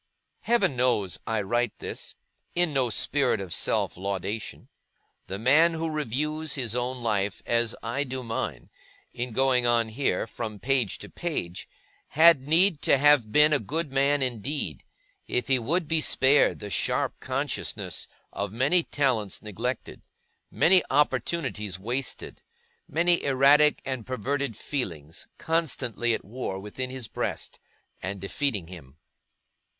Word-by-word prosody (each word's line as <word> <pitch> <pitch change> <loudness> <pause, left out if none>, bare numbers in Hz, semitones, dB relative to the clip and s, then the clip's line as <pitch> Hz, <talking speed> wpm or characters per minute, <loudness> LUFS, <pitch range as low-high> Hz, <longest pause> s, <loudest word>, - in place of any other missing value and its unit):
Heaven 205 - +1
knows 120 -7 +1
I 110 -2 0
write 120 +3 0
this, - - -6 0.4
in 175 -3 +2
no 130 -3 +2
spirit 130 +1 +1
of 95 -3 -4
self - - +1
laudation. 100 +3 -4 0.6
The 95 - -4
man 155 +9 +4
who 160 0 -2
reviews 150 +2 -2
his 120 -4 -2
own 125 0 -2
life, 105 -3 -1
as 115 -1 +1
I 120 +5 -1
do 130 -1 -5
mine, 115 - -4 0.4
in 120 0 -4
going 125 0 +2
on 115 -1 +2
here, 130 +5 0
from 110 -1 -6
page 125 -2 0
to - - -10
page, 145 - -4 0.4
had 160 -3 +5
need 170 +1 +3
to - - +4
have 140 -6 +4
been 150 +3 +5
a 145 - +3
good 145 +5 -3
man 140 +1 +2
indeed, 130 +4 -3 0.4
if 125 0 -1
he 130 -1 +4
would 160 +8 0
be 160 0 +2
spared 140 -1 +4
the 105 - -8
sharp - - -1
consciousness - - -3 0.3
of 100 -1 -3
many 140 - +3
talents 130 - -1
neglected, 115 +4 -4 0.5
many 185 +1 +5
opportunities 130 - 0
wasted, 120 +5 -4 0.5
many 170 +2 +2
erratic 140 +2 +5
and 130 -4 -4
perverted 130 -1 -2
feelings 85 - -5
constantly 130 -8 -1
at - - -8
war 105 -3 -4
within 105 +6 -5
his 130 -3 -6
breast, - - -4 0.4
and 100 +2 -4
defeating 100 - -2
him. 80 -6 -12
130 Hz, 135 wpm, -27 LUFS, 110-145 Hz, 0.6 s, had